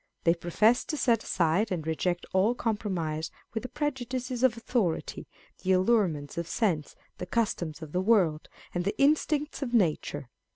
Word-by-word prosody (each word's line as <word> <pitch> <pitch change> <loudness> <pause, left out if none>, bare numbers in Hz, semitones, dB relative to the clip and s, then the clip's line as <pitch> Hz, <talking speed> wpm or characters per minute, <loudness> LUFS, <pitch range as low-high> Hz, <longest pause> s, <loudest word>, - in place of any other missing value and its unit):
They 165 - +5
profess 210 +8 +2
to 305 - -3
set 235 -5 +3
aside 180 +5 +1
and 165 -4 -2
reject 175 +2 -1
all 200 +6 +3
compromise 175 -9 -2 0.2
with 225 - -2
the 255 - -6
prejudices 255 -4 -3
of 255 -3 +3
authority, 225 -8 -1 0.3
the 190 0 +2
allurements 185 -7 +1
of 170 - -4
sense, 170 -8 -1 0.2
the 180 - -5
customs 175 -7 -1
of 155 - -9
the 180 - 0
world, 185 -7 +2 0.2
and 175 - -1
the 200 - -2
instincts 300 +1 +2
of 245 -3 -1
nature. 150 - 0
190 Hz, 160 wpm, -28 LUFS, 165-240 Hz, 0.3 s, They